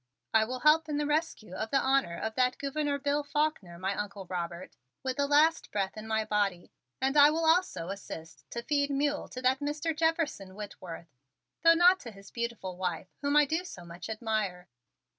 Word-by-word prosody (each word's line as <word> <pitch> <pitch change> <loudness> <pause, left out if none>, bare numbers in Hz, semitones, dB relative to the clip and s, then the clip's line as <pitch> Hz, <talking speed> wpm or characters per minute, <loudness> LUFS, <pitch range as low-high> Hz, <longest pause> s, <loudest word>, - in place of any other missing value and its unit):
"I 220 0 +5
will 250 +2 -5
help 310 +2 +5
in 295 - -1
the 295 - 0
rescue 295 - -1
of 220 +4 -3
the 275 - +3
honor 265 -11 +2
of 220 0 -3
that 250 +1 +2
Gouverneur 285 0 -1
Bill 285 +1 0
Faulkner, 285 - -1
my 190 +2 -1
Uncle 200 -1 -5
Robert, 175 0 -5 0.3
with 260 -1 -2
the 285 0 +2
last 305 +3 +4
breath 195 -2 -1
in 215 0 -8
my 220 0 0
body, 205 -4 -1 0.3
and 265 +2 +1
I 290 0 +9
will 325 +2 0
also 320 - +2
assist 165 -5 -8
to 235 - -5
feed 285 +1 +1
mule 285 +1 0
to 255 - -8
that 260 +1 +3
Mr. 300 +2 -2
Jefferson 315 - 0
Whitworth, 180 -6 -8 0.5
though 330 +1 +7
not 360 +2 +6
to 240 - -8
his 195 -1 -14
beautiful 235 -6 -4
wife 180 0 -3
whom 285 0 +1
I 295 0 +7
do 320 +5 -1
so 180 - -9
much 170 +5 -9
admire." 215 -5 -2
255 Hz, 195 wpm, -30 LUFS, 195-295 Hz, 0.5 s, I